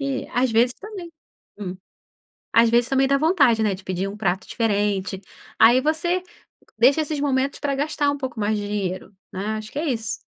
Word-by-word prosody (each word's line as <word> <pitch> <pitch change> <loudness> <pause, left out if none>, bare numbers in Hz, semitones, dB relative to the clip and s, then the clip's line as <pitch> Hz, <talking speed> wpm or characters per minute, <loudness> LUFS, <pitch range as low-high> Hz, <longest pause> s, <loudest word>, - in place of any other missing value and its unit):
e 275 -1 -2
às 250 0 +1
vezes 235 +3 +3
também. 395 -4 -9 0.5
Hum, 190 -3 -5 0.8
às 230 0 +5
vezes 235 +1 +3
também 270 0 +2
dá 275 +1 +3
vontade, 280 -7 +3
né, 210 -3 +1
de 185 - -15
pedir 185 +1 -2
um 200 - -7
prato 190 -3 -1
diferente. 205 -4 -1 0.4
Aí 240 +4 +6
você 320 +5 0 0.6
deixa 265 +7 +5
esses 305 -1 -3
momentos, 275 -1 0
pra 280 -2 -1
gastar 290 +1 0
um 285 - -1
pouco 260 -5 -5
mais 210 +1 0
de 205 - -4
dinheiro 195 -1 -4 0.2
né, 210 +3 -3
acho 215 0 -7
que 285 - -4
é 325 - -2
isso. 230 -3 -2
240 Hz, 190 wpm, -23 LUFS, 210-280 Hz, 0.8 s, Aí